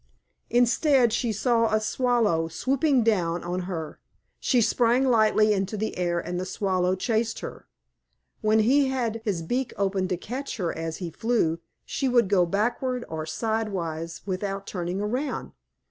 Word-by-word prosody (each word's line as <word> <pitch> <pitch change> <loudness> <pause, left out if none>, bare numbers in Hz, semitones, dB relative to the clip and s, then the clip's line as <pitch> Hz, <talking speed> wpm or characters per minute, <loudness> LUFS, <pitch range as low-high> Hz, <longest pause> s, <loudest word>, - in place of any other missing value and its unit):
Instead, 245 0 +3
she 235 -1 0
saw 230 +1 +2
a 215 - +3
Swallow 215 -7 +1
swooping 265 - +1
down 175 -6 +1
on 175 +1 -2
her. 160 -4 -5 0.4
She 250 - +2
sprang 240 +3 +3
lightly 215 -3 +4
into 195 +1 -2
the 220 +2 -2
air 175 -1 0
and 175 +1 -4
the - - -2
Swallow 185 -2 0
chased 225 +3 -1
her. - - -8 0.7
When 215 0 +3
he 270 +5 +4
had 235 -4 -2
his 190 -7 -1
beak 250 +9 -2
open 195 -1 0
to 180 -1 -1
catch 255 +9 -5
her 175 -5 -1
as 165 0 -4
he 175 -3 -5
flew, 220 -8 0 0.3
she 270 - -1
would 240 -5 +3
go 180 -3 +3
backward 240 +6 -1
or 160 -1 -4
sidewise 170 -4 -3
without 195 +1 -3
turning 180 +1 -3
around. 250 +8 -2
215 Hz, 155 wpm, -26 LUFS, 180-240 Hz, 0.7 s, lightly